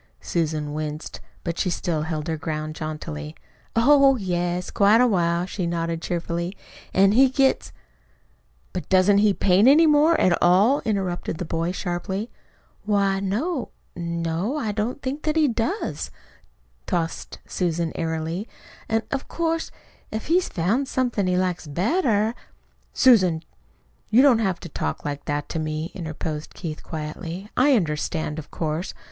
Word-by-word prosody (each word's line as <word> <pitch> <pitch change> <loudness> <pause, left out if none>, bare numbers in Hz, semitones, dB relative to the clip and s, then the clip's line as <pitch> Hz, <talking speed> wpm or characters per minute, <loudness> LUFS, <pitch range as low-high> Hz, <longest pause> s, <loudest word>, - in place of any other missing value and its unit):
Susan 155 -3 -2
winced, 150 0 -5 0.2
but 170 -1 -3
she 185 - +1
still 165 -2 -1
held 155 0 -3
her 165 - -1
ground 155 0 -4
jauntily. 115 - -6 0.4
"Oh, 275 +3 +6
yes, 180 -4 -2
quite 205 +3 +5
a 250 - +6
while," 175 -5 +1
she 185 -1 -3
nodded 165 -1 -2
cheerfully. 170 +2 -3 0.3
"An' 195 +1 +5
he 260 +5 +6
gets 265 +1 +2 0.5
" - - -38
"But - - -5
doesn't 190 +2 +5
he 210 0 +5
paint 195 +3 +4
any 305 +5 +7
more 310 +2 +5
at 180 -2 +4
all?" 200 +11 +4
interrupted 190 -6 -2
the 180 - -4
boy 165 +2 -1
sharply. 190 +4 -3 0.5
"Why, 200 -2 +2
no; 235 - -2 0.3
no, 170 - -2
I 225 -8 -1
don't 225 +7 -3
know 270 +3 -2
that 310 -1 -1
he 315 -2 +4
does," 235 - -2 0.8
tossed 165 -1 -2
Susan 170 -2 -1
airily. 165 +5 -3 0.4
"An' 225 0 +1
of 275 -1 -2
course, 330 -1 -1 0.4
if 220 0 -4
he's 355 +2 +3
found 215 +11 0
somethin' 240 -8 0
he 180 0 +2
likes 180 -3 -1
better 215 - +1 0.3
" - - -40 0.3
"Susan, 185 -11 +4 0.7
you 240 +5 +6
don't 260 -5 +6
have 190 -5 0
to - - -8
talk 75 - -4
like 145 -1 -4
that 145 0 -2
to 165 - -2
me" 155 +1 -3
interposed 155 -3 -5
Keith 160 -4 -6
quietly. 165 +5 -6
"I 275 +2 +5
understand, 155 -4 -1
of 150 - -10
course. 160 +2 -3
180 Hz, 150 wpm, -24 LUFS, 160-225 Hz, 0.8 s, any